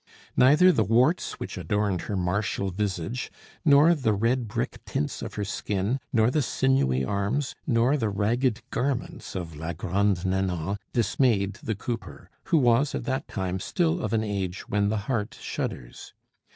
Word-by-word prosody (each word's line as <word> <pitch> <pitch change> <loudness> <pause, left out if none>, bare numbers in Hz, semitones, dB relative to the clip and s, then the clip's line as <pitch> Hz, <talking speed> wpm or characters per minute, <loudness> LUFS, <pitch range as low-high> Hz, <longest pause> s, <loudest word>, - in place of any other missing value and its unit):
Neither 150 +8 +6
the - - +2
warts 125 - +2
which - - -5
adorned 105 -4 0
her 100 - -1
martial 100 +2 -1
visage, 100 +3 -3 0.3
nor 150 +2 +6
the 130 -9 +1
red 115 +4 +1
brick 105 - -3
tints 75 - -3
of - - -6
her 105 - -2
skin, 100 +4 -1
nor 115 0 +3
the 150 - +2
sinewy 115 - +1
arms, 100 - -1
nor 120 +1 +3
the 115 -7 0
ragged 115 +4 0
garments 130 -2 -3
of 85 -4 -5
la 80 +3 -4
Grande 95 +2 0
Nanon, 95 0 -1
dismayed 105 -3 +1
the 110 - -2
cooper, 115 +4 -6
who 165 - +3
was 125 +1 +3
at - - -3
that 130 -1 -2
time 95 -2 -3
still 170 - 0
of 105 - -2
an 110 -1 +1
age 100 -3 -3
when 100 0 +1
the 110 - 0
heart 120 0 -2
shudders. - - -5
105 Hz, 160 wpm, -26 LUFS, 95-130 Hz, 0.3 s, Neither